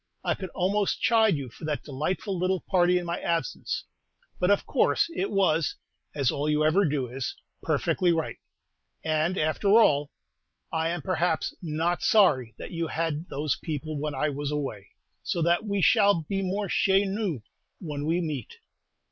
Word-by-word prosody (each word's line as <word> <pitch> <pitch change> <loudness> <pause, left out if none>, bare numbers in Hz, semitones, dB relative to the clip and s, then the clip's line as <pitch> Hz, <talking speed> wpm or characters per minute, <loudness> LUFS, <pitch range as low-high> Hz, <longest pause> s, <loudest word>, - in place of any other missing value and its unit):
I - - +1
could 190 -2 -6
almost 200 +2 +1
chide 220 -5 +4
you 135 -3 -6
for 110 - -15
that 150 -1 -2
delightful 170 +8 -3
little 185 +1 0
party 180 -1 +3
in 175 - -3
my 170 0 -2
absence, 165 -6 -2 0.6
but 180 - +2
of 205 - +3
course - - +2
it 195 - -1
was, 170 -6 +2 0.4
as 140 -4 +2
all 145 +2 -1
you 150 0 +2
ever 185 +6 +4
do 145 -4 0
is, 125 -2 -4 0.3
perfectly 180 -2 +1
right; 165 -2 -1 0.7
and, 160 +3 0
after 155 +5 0
all, 150 -10 +5 0.6
I 160 0 +1
am, 175 -2 -3
perhaps, 175 -3 0
not 165 +1 -1
sorry 140 - +3
that - - -8
you 165 -1 -2
had 165 +1 -2
those 145 0 -1
people 155 -1 -4
when 150 -1 -3
I 150 +3 0
was 145 0 -3
away, 135 -9 -4 0.3
so 170 - -1
that 175 +5 +2
we 200 -2 0
shall 205 -8 +4
be 195 +5 -2
more 195 +2 -1
chez 195 +2 +3
nous 195 - -2 0.3
when 150 -4 -5
we 170 +2 +1
meet. 150 -9 -4
165 Hz, 170 wpm, -27 LUFS, 150-190 Hz, 0.7 s, all